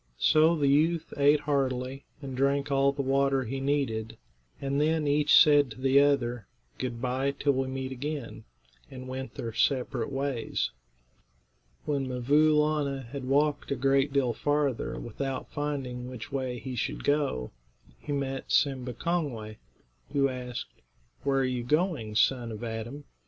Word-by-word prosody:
So 160 - +4
the 145 -3 +1
youth 155 +4 +2
ate 145 +1 +4
heartily, 135 -2 -1 0.2
and 135 -2 -5
drank 140 +2 +1
all 140 0 +4
the 140 0 -3
water 135 0 +2
he 130 +3 -4
needed, 135 -6 -1 0.4
and 140 +1 -1
then 155 0 +1
each 145 +1 +5
said 145 -3 +6
to 110 - -10
the 135 +1 +4
other, 125 -6 +1 0.3
"Good 120 -2 -3
bye, 130 +3 -1
till 145 - +2
we 130 0 -1
meet 130 0 -4
again," 140 0 -5 0.5
and 130 -1 -9
went 130 +1 -6
their 115 -2 -5
separate 135 +2 0
ways. 135 -3 -2 1.1
When 140 -3 -1
'Mvoo 145 +5 +3
Laana 150 -3 +1
had 135 0 -6
walked 145 +3 +1
a 140 - 0
great 135 +2 +2
deal 135 -4 +1
farther 145 -1 -1
without 130 +3 -5
finding 135 -4 -3
which 125 -3 -8
way 130 -2 -2
he 125 +2 -6
should 120 - -3
go, 145 - 0 0.5
he 150 - -7
met 135 -1 -3
Simba 130 -3 +1
Kongway, 125 -11 -2 0.6
who 135 -1 +3
asked, 125 -1 -7 0.4
"Where 135 -1 +2
are - - +2
you 125 -1 -1
going, 150 - 0
son 120 0 +2
of 110 +1 -7
Adam?" 115 +5 -5
135 Hz, 150 wpm, -28 LUFS, 125-145 Hz, 1.1 s, said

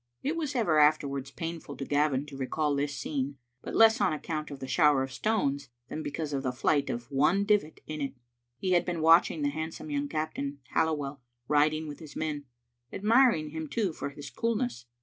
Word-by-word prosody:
It 300 +4 0
was 300 -4 -3
ever 175 -11 +3
afterwards 140 -3 +2
painful 165 -2 -6
to 135 - -4
Gavin 145 -1 +1
to 145 -2 -10
recall 145 +2 0
this 140 0 -1
scene, 140 0 -3 0.2
but - - -6
less 225 +2 +6
on - - +3
account 155 0 -4
of 140 -2 -8
the 130 - -6
shower 150 -2 +4
of 135 - -5
stones 140 - 0 0.2
than 155 - -4
because 150 0 -4
of 135 - 0
the 130 -2 -1
flight 140 +3 +1
of 120 +3 -5
one 155 +9 +3
divit 205 -7 +1
in 155 -1 -5
it. 140 -1 -3 0.4
He 185 +7 -1
had 175 -1 +4
been 175 -3 -3
watching 165 -1 +5
the 145 - +2
handsome 155 +1 -5
young 145 0 -1
captain, 150 -2 -3 0.2
Halliwell, 145 -4 0 0.3
rid 150 +1 +4
ing 155 0 -4
with 145 - -7
his 155 -3 -11
men; 150 -2 -3 0.5
admiring 220 - +3
him, 160 0 -4
too, 195 +1 -1
for 140 - -4
his 140 0 -9
coolness. 230 - -2
150 Hz, 200 wpm, -29 LUFS, 140-165 Hz, 0.5 s, less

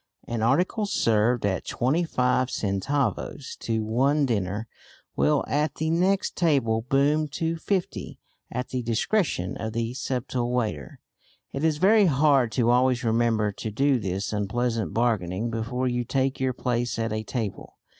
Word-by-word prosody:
An 115 -1 -2
article 180 - +1
served 115 - +2
at 95 -2 0
twenty 140 +8 0
five 125 -4 +1
centavos 125 +6 -2
to 110 -1 -2
one 135 +7 +2
diner 105 -2 -2 0.5
will 150 -1 +2
at 150 +1 0
the 160 +1 -1
next 185 +4 +1
table 135 -10 +2
boom 140 +5 +2
to 165 +3 -2
fifty 185 +2 -3 0.3
at 125 +1 -3
the 130 - -2
discretion 115 - 0
of 110 -1 -4
the 115 +1 -2
subtle 125 -2 -2
waiter. 110 - -2 0.5
It 135 - -4
is 160 -2 +2
very 200 +4 +5
hard 140 -5 +3
to 120 +1 +2
always 125 0 +3
remember 115 -2 +2
to 110 - -5
do 135 +4 +2
this 100 0 -3
unpleasant 110 -1 -1
bargaining 110 -2 0
before 120 +3 -2
you 120 -1 0
take 130 +2 -1
your 130 -1 0
place 120 -1 -1
at 115 -1 -1
a 110 - -1
table. 110 -2 -5
125 Hz, 150 wpm, -26 LUFS, 110-140 Hz, 0.5 s, very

